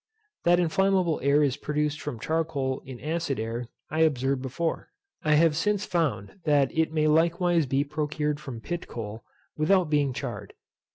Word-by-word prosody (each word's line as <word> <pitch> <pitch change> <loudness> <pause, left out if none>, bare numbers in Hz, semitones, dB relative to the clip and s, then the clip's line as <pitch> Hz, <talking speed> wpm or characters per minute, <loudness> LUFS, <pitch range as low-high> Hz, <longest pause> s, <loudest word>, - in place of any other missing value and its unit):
That 175 +1 +5
inflammable 180 0 +2
air 140 +2 +4
is 140 -2 +1
produced 150 0 -1
from 115 - -5
charcoal 150 -2 -1
in 130 -2 -8
acid 160 -4 -2
air 115 +2 -3 0.2
I 155 - -1
observed 135 -4 +2
before. 150 +6 -3 0.3
I 155 -1 +4
have 160 0 +4
since 205 +4 0
found 165 - -1
that 145 -4 +2
it 160 0 +2
may 155 -1 +1
likewise 165 +1 +3
be 135 +2 +1
procured 150 0 -2
from 135 -7 -7
pit 175 +5 -4
coal, 110 -1 -6 0.3
without 165 +1 +3
being 145 -2 +2
charred. 105 -5 -6
150 Hz, 160 wpm, -27 LUFS, 135-165 Hz, 0.3 s, That